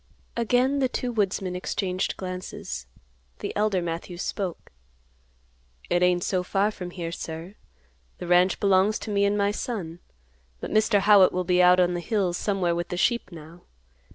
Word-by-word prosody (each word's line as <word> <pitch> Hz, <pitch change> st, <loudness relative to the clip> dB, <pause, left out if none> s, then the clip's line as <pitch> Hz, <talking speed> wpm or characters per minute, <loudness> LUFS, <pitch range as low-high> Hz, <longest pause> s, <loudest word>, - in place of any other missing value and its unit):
Again 250 Hz, +4 st, +2 dB
the 260 Hz, -2 st, +1 dB
two 250 Hz, -1 st, -3 dB
woodsmen 195 Hz, -4 st, -1 dB
exchanged 185 Hz, 0 st, -2 dB
glances. 185 Hz, -, -6 dB, 0.5 s
The -, -, -5 dB
elder 205 Hz, -3 st, +1 dB
Matthews 175 Hz, +2 st, -5 dB
spoke, 190 Hz, -5 st, -4 dB, 1.2 s
"It 175 Hz, -, +3 dB
ain't 180 Hz, -1 st, +3 dB
so 185 Hz, -2 st, 0 dB
far 195 Hz, +3 st, 0 dB
from 180 Hz, -4 st, -7 dB
here, 170 Hz, -2 st, -5 dB
sir. 165 Hz, +3 st, -7 dB, 0.6 s
The -, -, -7 dB
ranch 180 Hz, +2 st, +3 dB
belongs 195 Hz, +2 st, +3 dB
to 215 Hz, -, -6 dB
me 200 Hz, 0 st, +2 dB
and 200 Hz, +1 st, +1 dB
my 200 Hz, 0 st, +2 dB
son. 195 Hz, -7 st, -5 dB, 0.6 s
But -, -, -6 dB
Mr. 215 Hz, -1 st, +3 dB
Howitt 200 Hz, -2 st, +6 dB
will 180 Hz, 0 st, -1 dB
be 180 Hz, 0 st, +3 dB
out 180 Hz, 0 st, +6 dB
on 180 Hz, -1 st, +3 dB
the 175 Hz, -, -2 dB
hills 185 Hz, -2 st, -1 dB
somewhere 190 Hz, -3 st, 0 dB
with 175 Hz, 0 st, -3 dB
the 180 Hz, -, -4 dB
sheep 235 Hz, 0 st, +1 dB
now. 165 Hz, +1 st, -12 dB
185 Hz, 165 wpm, -25 LUFS, 175-205 Hz, 1.2 s, Howitt